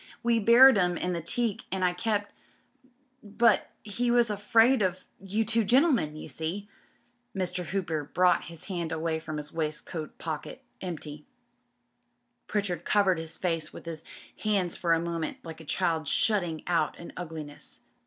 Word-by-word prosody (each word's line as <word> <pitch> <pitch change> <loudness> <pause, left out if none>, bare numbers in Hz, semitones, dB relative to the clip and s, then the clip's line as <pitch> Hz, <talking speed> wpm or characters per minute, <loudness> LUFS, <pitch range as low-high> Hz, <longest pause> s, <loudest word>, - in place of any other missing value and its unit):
We 235 -1 +3
buried 235 +2 +8
'em 175 -1 +2
in 180 - -1
the 170 - -2
teak 225 +5 -1
and 190 -1 0
I 180 - +2
kept... 205 +2 -1 0.9
But 230 +2 +2
he 235 +3 -1
was 240 -2 +4
a - - -1
friend 225 +4 +4
of 185 -1 -1
you 205 +4 -1
two 230 +1 +2
gentlemen, 245 - +3
you 155 - -8
see.^ 175 +6 -4 0.7
Mr. 180 0 -1
Hooper 165 -4 -2
brought 180 +3 +3
his 165 -1 -10
hand 175 -4 -3
away 160 0 -1
from 155 -1 -6
hi« 150 - -3
waistcoat 155 0 -4
pocket 155 -3 -6
— - - -43
empty. 150 -4 -6 1.2
Pritchard 190 -5 -1
covered 195 -4 +3
his 160 0 -7
face 165 -3 -2
with - - -11
his 165 -2 -6 0.4
hands 200 -5 0
for 170 -2 +1
a 165 - +3
moment, 165 -1 -3
like 160 -1 -8
a - - -12
child 160 -1 0
shutting 175 -4 +1
out 165 -3 +1
an 170 - -10
ugliness. 155 -4 -7
180 Hz, 165 wpm, -28 LUFS, 160-210 Hz, 1.2 s, buried